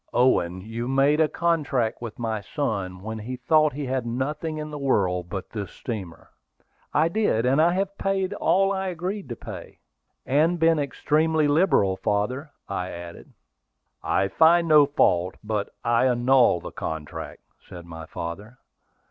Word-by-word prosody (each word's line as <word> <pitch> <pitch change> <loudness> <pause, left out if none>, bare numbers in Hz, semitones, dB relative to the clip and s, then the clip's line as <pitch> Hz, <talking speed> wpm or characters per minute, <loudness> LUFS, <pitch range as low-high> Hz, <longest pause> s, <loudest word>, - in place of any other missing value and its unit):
Owen, 95 -8 +2
you 115 +4 -5
made 135 +3 +3
a 160 - +5
contract 150 -10 0
with 115 -3 -7
my 110 -3 -2
son 95 -8 -3
when 110 +1 -5
he 120 +4 -5
thought 155 +4 +3
he 145 +1 -4
had 130 -1 -1
nothing 140 +7 -3
in 150 0 -5
the 150 - -6
world 90 -10 0
but 95 0 -6
this 105 -3 -5
steamer." 95 -9 -7 0.6
"I 155 +2 +3
did; 170 - +1
and 135 +4 +3
I 170 +2 +4
have 195 +1 -1
paid 195 0 0
all 195 -1 +2
I 190 0 -2
agreed 185 +2 -4
to 120 - -4
pay." - - -9 0.5
"And 155 +6 +2
been 165 -1 +4
extremely 155 +2 +1
liberal, 145 - +3
father," 125 +11 -1 0.2
I 90 -2 -3
added. 85 -1 -9 0.7
"I 95 - +1
find 165 - +4
no 150 -2 +6
fault; 90 - +2
but 105 -1 -2
I 120 +2 +3
annul 125 -6 +3
the - - -7
contract," 80 -1 -6 0.2
said 85 -1 -12
my 80 -1 -9
father. 100 +11 -7
130 Hz, 155 wpm, -25 LUFS, 100-155 Hz, 0.7 s, no